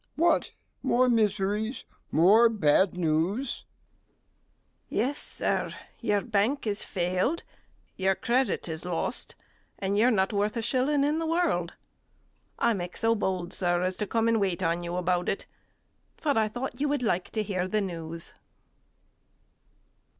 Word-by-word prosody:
G. - - -40 0.2
What? 345 - +3 0.3
more 255 +1 +3
miseries, 215 0 +1 0.3
more 205 +9 +6
bad 190 -3 +3
news! 180 - 0
STEWARD. - - -8 1.2
Yes, 265 +7 0
Sir, - - -1 0.2
your 210 -3 +1
bank 230 +5 0
has 205 -2 -1
failed, 185 - -1 0.5
your 190 0 +2
credit 240 -3 0
is 160 -1 -5
lost 175 -2 -3 0.4
and 195 +1 -1
you're 225 +4 +4
not 195 -3 +1
worth 205 +3 0
a - - 0
shilling 275 +4 +1
in 300 +3 +1
the 325 - -2
world. 320 - 0 0.8
I 235 - +3
make 180 -3 -4
bold, 190 -6 0
Sir, 175 0 +1
to 205 +3 -3
come 225 +1 +1
and 230 -2 +2
wait 185 -2 0
on 170 +1 0
you 175 0 -4
about 180 0 0
it; - - -2 0.7
for 290 -3 0
I 220 -1 +3
thought 245 +3 -5
you 295 - +2
would 285 -3 0
like 185 -5 0
to 215 - 0
hear 185 -3 -2
the 215 +2 0
news. 165 -3 -6
205 Hz, 145 wpm, -28 LUFS, 180-235 Hz, 1.2 s, more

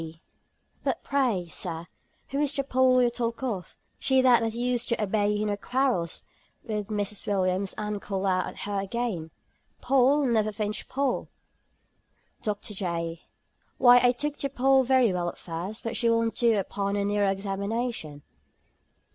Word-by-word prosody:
T. 165 0 -8 0.6
"But - - -1
pray, 250 -10 +1
Sir, 165 0 -5 0.4
who 275 - -2
is 290 -1 +1
the 275 - 0
Poll 255 -1 +4
you 240 - +2
talk 235 +1 -3
of? 205 -9 -4 0.2
She 265 -1 +3
that 245 -2 +6
you 230 - -6
used 250 -1 0
to 235 - 0
abet 205 0 +1
in 210 0 0
her 205 - 0
quarrels 245 -6 -1 0.4
with 210 -3 -3
Mrs. 205 -1 -2
Williams, 190 -1 0
and 210 -1 -3
call 195 -1 -3
out, 185 -1 +1
At - - -9
her 200 -1 -2
again, 195 -5 -3 0.5
Poll! 275 +2 +3
Never 220 -3 +2
flinch, 210 +1 -4
Poll!" 270 -1 -1 1.1
DR. 210 -1 -1 0.2
J. 170 -4 -3 0.6
"Why, 245 0 +8
I 245 - +6
took 295 +4 -3
to 275 - -2
Poll 270 0 +4
very 255 -5 +3
well 175 -1 -1
at - - -10
first, 180 +7 -6
but 230 0 -3
she 230 +1 +2
won't 230 0 +2
do 230 -3 +3
upon 200 0 -2
a 200 -1 0
nearer 205 -1 +2
examination." 195 - -3
215 Hz, 165 wpm, -27 LUFS, 195-250 Hz, 1.1 s, Why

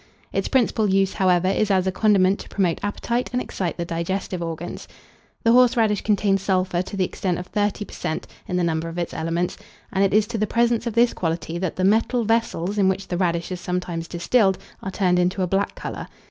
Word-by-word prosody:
Its - - 0
principal 225 -5 +2
use, 195 0 +2
however, 185 -1 +2
is 195 +2 +1
as 190 -2 +3
a 190 - +1
condiment 195 -1 +3
to - - -10
promote 185 -4 0
appetite 235 +4 -1
and 250 - 0
excite 185 -8 -3
the 170 - -2
digestive 175 +2 -3
organs. 165 +1 -5 0.6
The 230 - +4
horseradish 230 -4 +4
contains 200 -2 +2
sulphur 185 -2 +1
to 195 +2 -6
the 185 - +2
extent 180 -1 -2
of 180 - -5
thirty 205 +1 -1
per - - -14
cent, 160 - -3 0.2
in 180 - -1
the 180 - +1
number 165 0 -1
of 165 - -8
its 175 -1 -3
elements; 165 +2 -2 0.3
and 195 0 +2
it 195 - +3
is 210 +1 +4
to 230 -2 -3
the 215 - +1
presence 235 +1 +1
of 230 - -3
this 235 +1 +4
quality 165 0 -3
that 185 -2 -2
the 185 - -2
metal 225 +5 +3
vessels 210 -3 0
in 190 -1 +4
which 190 +1 -3
the 175 - -1
radish 170 -1 0
is 180 -1 -4
sometimes 180 -2 -3
distilled, 190 +3 +2 0.2
are 190 - -4
turned 180 -2 +2
into 180 +2 +1
a - - 0
black 195 +3 0
colour. - - -6
190 Hz, 215 wpm, -23 LUFS, 175-210 Hz, 0.6 s, The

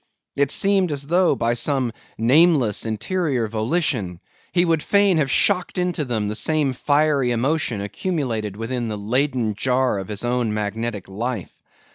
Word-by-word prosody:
It 140 -1 +2
seemed 195 0 +2
as 140 -1 -2
though, 175 0 +3
by 115 -1 0
some 130 0 0 0.3
nameless, 130 - +3
interior 130 - -1
volition, 110 - -1 0.3
he 175 0 +3
would 165 -2 +1
fain 200 -1 +3
have 140 -3 +1
shocked 185 +3 +1
into 180 -4 -1
them 110 -5 -2
the 105 - -2
same 150 +3 +1
fiery 145 0 +2
emotion 120 -2 0
accumulated 110 - -3
within 120 +1 -3
the 105 -1 -4
Leyden 120 +1 0
jar 125 0 0
of 95 - -6
his 105 +2 -3
own 120 -3 0
magnetic 105 0 -3
life. 110 +1 -4
125 Hz, 150 wpm, -22 LUFS, 110-155 Hz, 0.3 s, though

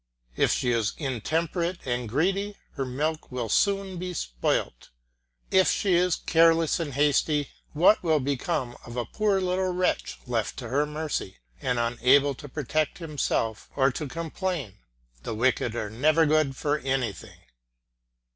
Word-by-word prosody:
If - - +3
she 125 - +1
is 115 -3 +1
intemperate 165 - -2
and 120 -2 -2
greedy 195 - 0
her 135 - -3
milk 155 +5 -2
will 125 -3 -3
soon 195 - +1
be 180 0 -4
spoilt; - - -2 0.6
if 190 0 +5
she 195 -3 +1
is 180 0 +3
careless 165 0 +3
and 145 -5 -4
hasty 145 0 +2 0.2
what 175 +8 +5
will 160 -3 +2
become 135 -1 -2
of 120 +1 -9
a 120 - -1
poor 205 - +1
little 185 0 0
wretch 180 0 -1
left 115 -4 -2
to 120 -3 -6
her 145 +4 +1
mercy, 150 -10 -4 0.2
and 125 -1 0
unable 125 +4 +3
either 135 - -9
to 145 - -9
protect 155 +2 -1
himself 145 -9 -2
or 135 -1 +3
to 150 +3 -4
complain. 165 - -4 0.4
The 110 - -4
wicked 120 0 +1
are 105 -3 -3
never 155 +8 +3
good 155 -3 +2
for 150 +2 0
anything. 130 -8 -3
145 Hz, 150 wpm, -26 LUFS, 125-170 Hz, 0.6 s, if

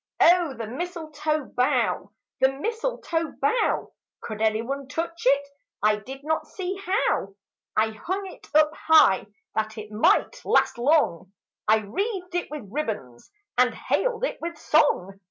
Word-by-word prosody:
O 340 -5 +5
the 230 - -5
mistletoe 310 +2 -3
bough, 250 -5 0 0.3
the 265 0 +4
mistletoe 335 - -2
bough! 290 - +1 0.3
Could 215 -1 -6
anyone 230 +6 0
touch 335 +3 -4
It? 280 +1 +4 0.4
I 210 0 +4
did 265 +6 -9
not 315 +1 -1
see 375 -1 -4
how. 390 +3 +1
Vigils 195 0 -10 0.4
I 220 +1 +3
hung 375 - -4
It 375 - -11
up 305 0 +6
high 320 0 +5 0.3
that 220 0 -2
it 215 0 -8
might 370 - +2
last - - +2
long, 240 - +2 0.4
I 215 +1 +5
wreathed 365 - -3
it 350 0 -1
with 295 -8 -7
ribbons 210 - -4 0.3
and 250 0 +4
hailed - - 0
it - - -4
with 335 -1 -4
song. 245 - +2
290 Hz, 145 wpm, -25 LUFS, 220-345 Hz, 0.4 s, up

